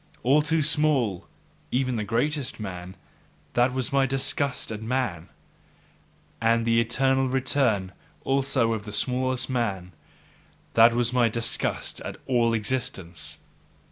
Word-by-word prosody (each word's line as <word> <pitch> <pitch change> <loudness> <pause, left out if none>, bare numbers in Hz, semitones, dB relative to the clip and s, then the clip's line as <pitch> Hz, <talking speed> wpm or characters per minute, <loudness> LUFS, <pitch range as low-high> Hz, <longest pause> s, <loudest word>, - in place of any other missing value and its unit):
All 140 +5 +4
too 160 +1 +1
small, 145 - +1 0.4
even 130 0 0
the 110 - -1
greatest 125 +6 -1
man! 90 -3 -7 0.6
that 120 +2 +3
was 130 0 -2
my 135 -1 +3
disgust 135 -1 0
at 105 -1 -5
man! 110 -8 -2 1.1
And 115 0 +2
the 115 0 +4
eternal 130 +3 +1
return 125 -7 +1 0.3
also 135 -4 +1
of 105 -2 -4
the 105 - -7
smallest 130 +2 0
man! 100 -8 -2 0.8
that 115 +1 +6
was 120 0 +1
my 120 -2 +3
disgust 115 +1 -2
at - - -7
all 120 -3 +2
existence! 105 -7 -3
120 Hz, 125 wpm, -26 LUFS, 110-135 Hz, 1.1 s, that